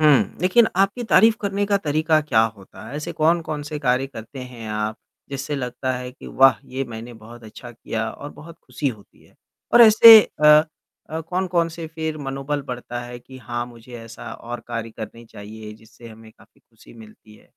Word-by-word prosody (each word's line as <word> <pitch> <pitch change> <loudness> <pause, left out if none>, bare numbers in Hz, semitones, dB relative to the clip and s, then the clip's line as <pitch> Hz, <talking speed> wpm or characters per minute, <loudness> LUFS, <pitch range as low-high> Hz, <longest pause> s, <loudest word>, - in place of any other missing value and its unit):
हुँ। 150 -3 +3
लेकिन 185 +6 +4
आपकी 195 +5 +1
तारीफ़ 225 +1 +6
करने 200 0 -1
का 200 0 +2
तरीका 155 -2 +1
क्या 145 -7 +2 0.2
होता 100 +3 -14
है? 140 - -7
ऐसे 155 +3 -5
कौन-कौन 160 -1 0
से 150 +1 -6
कार्य 130 0 +1
करते 120 +1 -11
हैं 125 -3 -9
आप 105 +1 -3 0.3
जिससे 140 +2 -4
लगता 130 0 -3
है 125 0 -6
कि - - -14
वाह! 135 0 +4
ये 135 +1 -4
मैंने 115 +1 -8
बहुत 115 +1 -14
अच्छा 110 +2 -11
किया 110 -1 -4
और 145 +5 -9
बहुत 165 +2 -13
खुशी 145 - -3
होती 105 -5 -12
है? - - -25 0.4
और 240 - +9
ऐसे 225 0 +10 0.3
अ 150 0 +8 0.5
अ, 160 +1 -3
कौन-कौन 175 0 -1
से 165 0 -8
फिर 160 -1 -5
मनोबल 140 +1 -4
बढ़ता 120 -1 -5
है 120 0 -9
कि 130 +2 -14
हाँ, 120 0 -4
मुझे 120 0 -15
ऐसा 115 0 -10
और 120 0 -8
कार्य 115 -1 -4
करने 110 +1 -9
चाहिए 105 0 -11
जिससे 110 +2 -16
हमें 110 0 -14
काफ़ी - - -24
खुशी 115 0 -20
मिलती 110 -1 -16
है? - - -23
130 Hz, 190 wpm, -22 LUFS, 115-155 Hz, 0.5 s, ऐसे